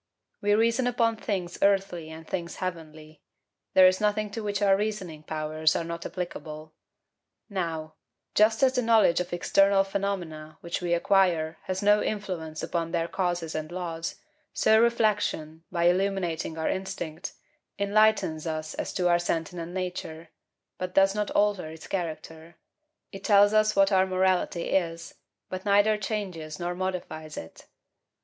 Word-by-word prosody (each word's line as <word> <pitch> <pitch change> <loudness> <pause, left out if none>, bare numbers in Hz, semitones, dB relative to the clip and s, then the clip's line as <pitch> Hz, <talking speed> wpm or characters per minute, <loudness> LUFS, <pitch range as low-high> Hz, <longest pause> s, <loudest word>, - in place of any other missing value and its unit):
We 205 0 +3
reason 230 +3 +2
upon 230 -2 +2
things 185 -6 -3
earthly 195 -5 +1
and 160 0 -10
things 170 -2 -4
heavenly; 155 -4 -7 0.5
there 185 - +8
is 185 +1 +4
nothing 210 0 0
to 225 - -4
which 205 -1 -2
our 200 -2 +4
reasoning 195 -7 -3
powers 155 0 0
are - - 0
not 170 0 -5
applicable. 155 -3 -7 0.8
Now, 165 -5 -3 0.4
just 220 +3 +4
as 260 -1 +5
the 250 - +1
knowledge 225 -7 +4
of 180 - -3
external 195 +2 +3
phenomena, 180 -6 -4
which 170 +1 -4
we 175 -1 +1
acquire, 170 -3 +2
has 185 +1 -3
no 210 +1 +5
influence 180 -7 -4
upon 165 -1 -2
their 165 0 -1
causes 175 -3 -2
and 155 +1 -4
laws, 170 -2 -4 0.4
so 220 0 +4
reflection, 205 -9 0
by 170 -2 0
illuminating 175 -3 0
our 160 - -1
instinct, 175 -4 -4 0.4
enlightens 200 -6 +2
us 155 -1 -3
as - - -4
to 180 -1 +1
our 175 0 +4
sentient 170 0 -3
nature, 175 -3 -5 0.5
but 185 0 -4
does 195 0 +5
not 210 0 -1
alter 205 -6 +1
its 160 0 -10
character; 165 -2 -5 0.6
it 195 -1 -9
tells 205 -1 +5
us 215 0 +3
what 195 +1 +4
our 190 -1 +4
morality 185 -2 +1
is, 165 -3 -1 0.3
but 185 0 -6
neither 205 +1 +4
changes 190 -7 -4
nor 175 0 -2
modifies 175 -4 -5
it. 80 - -10
180 Hz, 150 wpm, -27 LUFS, 165-200 Hz, 0.8 s, there